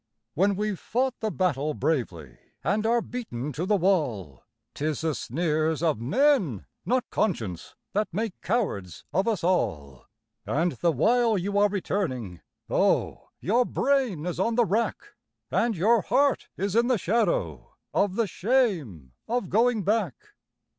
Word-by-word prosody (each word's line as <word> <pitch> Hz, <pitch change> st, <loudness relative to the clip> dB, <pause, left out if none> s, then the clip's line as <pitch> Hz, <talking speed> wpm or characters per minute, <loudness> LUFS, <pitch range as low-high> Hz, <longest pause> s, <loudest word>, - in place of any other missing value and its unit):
When 195 Hz, -, +2 dB
we've 210 Hz, -1 st, -2 dB
fought 255 Hz, +1 st, -1 dB
the 220 Hz, -, -1 dB
battle 155 Hz, -7 st, 0 dB
bravely 85 Hz, -, -2 dB, 0.3 s
and 210 Hz, +8 st, +1 dB
are 235 Hz, 0 st, +2 dB
beaten 150 Hz, -, -5 dB
to 170 Hz, +7 st, -3 dB
the 210 Hz, -, +3 dB
wall, 145 Hz, -, 0 dB, 0.3 s
'Tis 150 Hz, -1 st, -2 dB
the 160 Hz, -1 st, 0 dB
sneers 155 Hz, +3 st, -1 dB
of 155 Hz, -9 st, +1 dB
men, 190 Hz, -, +2 dB, 0.2 s
not 250 Hz, +3 st, +1 dB
conscience, 110 Hz, -, -2 dB, 0.2 s
that 210 Hz, +1 st, +1 dB
make 215 Hz, +3 st, -2 dB
cowards 100 Hz, -, -2 dB
of 190 Hz, +7 st, +1 dB
us 220 Hz, -7 st, 0 dB
all; 75 Hz, -, -1 dB, 0.4 s
And 170 Hz, +4 st, 0 dB
the 170 Hz, 0 st, +1 dB
while 230 Hz, +3 st, +3 dB
you 200 Hz, +2 st, 0 dB
are 205 Hz, 0 st, +4 dB
returning, 130 Hz, -, -3 dB, 0.3 s
oh! -, -, +1 dB
your 235 Hz, +6 st, +3 dB
brain 250 Hz, -, 0 dB
is 180 Hz, -1 st, -3 dB
on 225 Hz, +4 st, +1 dB
the 240 Hz, -1 st, +4 dB
rack, 215 Hz, +4 st, 0 dB, 0.5 s
And 230 Hz, -4 st, +1 dB
your 220 Hz, +6 st, +4 dB
heart 280 Hz, +8 st, +1 dB
is 200 Hz, +1 st, -2 dB
in 235 Hz, +1 st, +4 dB
the 250 Hz, -2 st, +3 dB
shadow 235 Hz, -, -1 dB, 0.2 s
of 200 Hz, -2 st, +1 dB
the 230 Hz, -, +2 dB
shame 180 Hz, -, 0 dB, 0.2 s
of 240 Hz, -4 st, -1 dB
going 225 Hz, +1 st, +3 dB
back. 200 Hz, -, +1 dB
190 Hz, 145 wpm, -26 LUFS, 150-230 Hz, 0.5 s, are